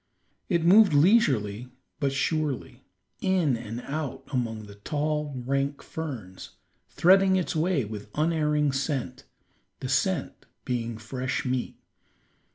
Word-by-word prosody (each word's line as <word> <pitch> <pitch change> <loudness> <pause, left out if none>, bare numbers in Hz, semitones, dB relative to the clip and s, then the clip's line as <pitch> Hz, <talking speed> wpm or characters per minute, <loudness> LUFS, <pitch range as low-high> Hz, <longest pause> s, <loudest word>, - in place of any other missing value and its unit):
It 170 -4 +1
moved 195 -2 +7
leisurely 130 - +3 0.3
but 140 -3 +1
surely, 145 -1 -2 0.4
in 180 -8 +2
and 115 +1 -6
out 145 0 -4
among 115 -4 -2
the 100 - -11
tall, 150 +5 -2
rank 140 +1 -1
ferns, 120 -13 -7 0.4
threading 190 +2 +5
its 185 -3 -1
way 160 -5 +1
with 105 0 -8
unerring 150 -2 +2
scent, 135 -2 -3 0.5
the - - -5
scent - - -1 0.2
being 120 -2 -2
fresh 130 +4 -3
meat. 125 -1 -2
140 Hz, 115 wpm, -27 LUFS, 120-160 Hz, 0.5 s, moved